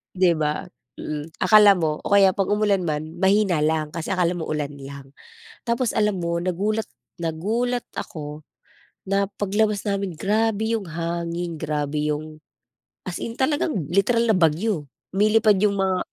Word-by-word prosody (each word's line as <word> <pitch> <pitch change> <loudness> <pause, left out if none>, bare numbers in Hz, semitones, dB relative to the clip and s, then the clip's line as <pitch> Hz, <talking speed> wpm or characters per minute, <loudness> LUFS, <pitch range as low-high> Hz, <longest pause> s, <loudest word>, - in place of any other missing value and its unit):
'Di 185 -1 +4
ba? 150 -1 -1 0.3
Mm. 150 0 -5 0.2
Akala 210 -2 +7
mo 155 -4 -1
o 200 - +2
kaya 195 -1 +7
'pag 195 -1 -1
umulan 205 -3 +1
man 155 +1 -4
mahina 195 -3 +3
lang, 155 0 0
kasi 165 +3 -3
akala 180 -2 +2
mo 160 - -4
ulan 150 -2 -2
lang. 140 0 -10 0.5
Tapos 235 0 -1
alam 210 -3 +1
mo, 170 0 -1
nagulat 205 +5 -1 0.4
nagulat 225 +10 -1
ako 150 -1 -6 0.7
na 200 0 +2 0.2
paglabas 205 +1 +1
namin 200 -2 -1
grabe 220 +5 0
yung 215 - -5
hangin, 170 +1 -3
grabe 150 -1 -2
yung 155 +1 -6 0.7
as 180 -2 -5
in 230 - -5
talagang 290 +5 0 0.2
literal 210 +6 +3
na 215 - +4
bagyo. 165 0 +1 0.2
Nilipad 210 +1 +3
yung 205 +1 +2
mga 190 -1 +1
185 Hz, 150 wpm, -23 LUFS, 160-210 Hz, 0.7 s, Akala